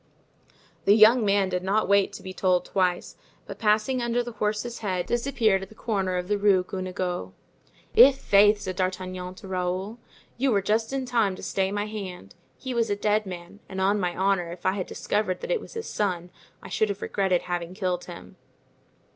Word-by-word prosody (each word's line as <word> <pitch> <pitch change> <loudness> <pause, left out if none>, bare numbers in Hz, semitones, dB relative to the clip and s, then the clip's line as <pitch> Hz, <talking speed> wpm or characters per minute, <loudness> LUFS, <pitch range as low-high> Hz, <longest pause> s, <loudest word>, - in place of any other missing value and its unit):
The 200 - +6
young 225 +2 +7
man 200 -2 +2
did 180 -1 -1
not 200 +4 +1
wait 200 0 +3
to - - -9
be 185 - -7
told 185 -1 +1
twice, 180 -2 -1 0.3
but - - -9
passing 220 +4 +2
under 240 0 0
the 240 - -6
horse's 215 +2 -2
head 185 -5 -2
disappeared 235 -4 +1
at 195 - -8
the 220 - -16
corner 195 -5 -1
of 180 0 -3
the 205 0 0
Rue 195 -3 +4
Guenegaud. 180 - -4 0.6
"I'faith!" 210 -5 +6
said 185 -1 -5
D'Artagnan 185 -1 -3
to 195 0 -11
Raoul, 185 +4 -3 0.4
"you 270 +2 +2
were 200 -3 +2
just 220 +3 0
in 270 -1 -2
time 230 -6 +1
to - - -11
stay 190 0 -1
my 205 0 -1
hand. 190 - -7 0.2
He 260 -1 -5
was 235 -1 +1
a 205 - +1
dead 210 0 0
man; 175 +2 -9
and 190 - -5
on 200 +2 +2
my 180 -2 -1
honor, 190 -3 +1
if 175 0 -10
I 185 - +4
had 190 -2 -3
discovered 205 -3 -1
that - - -4
it - - +1
was - - -12
his 450 0 -5
son, 180 -4 -2 0.3
I - - -8
should 220 - +1
have 200 0 -4
regretted 190 -3 0
having 175 0 -4
killed 180 -2 -2
him." - - -11
200 Hz, 195 wpm, -26 LUFS, 185-215 Hz, 0.6 s, young